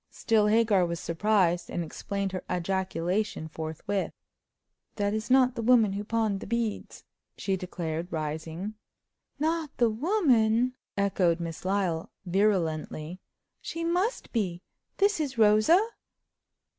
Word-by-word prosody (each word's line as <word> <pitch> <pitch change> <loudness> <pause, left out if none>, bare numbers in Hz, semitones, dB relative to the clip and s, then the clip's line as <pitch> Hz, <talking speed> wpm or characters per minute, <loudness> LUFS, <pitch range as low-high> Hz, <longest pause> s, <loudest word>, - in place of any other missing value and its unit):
Still, 220 -2 +2
Hagar 215 -3 +4
was 170 -1 -2
surprised, 175 -1 +1
and 175 - -2
explained 195 +4 -4
her 185 - -4
ejaculation 185 0 -1
forthwith. 160 +5 -3 0.8
"That 205 -1 0
is 215 +2 -3
not 255 -1 +5
the 240 - -4
woman 225 -4 +4
who 200 +1 -3
pawned 220 -2 0
the - - -8
beads!" 230 -1 -3 0.3
she 195 - 0
declared, 175 -2 -4
rising. 160 +5 -4 0.6
"Not 320 +1 0
the 235 -2 +3
woman?" 250 - +2 0.2
echoed 185 -4 +2
Miss 165 -2 -5
Lyle, 185 -4 0 0.2
virulently. 175 -3 0 0.4
"She 330 - -5
must 360 +8 -1
be! 185 -6 -1 0.3
This 405 -2 +3
is 280 -5 -2
Rosa!" 215 - +6
200 Hz, 120 wpm, -28 LUFS, 175-230 Hz, 0.8 s, Rosa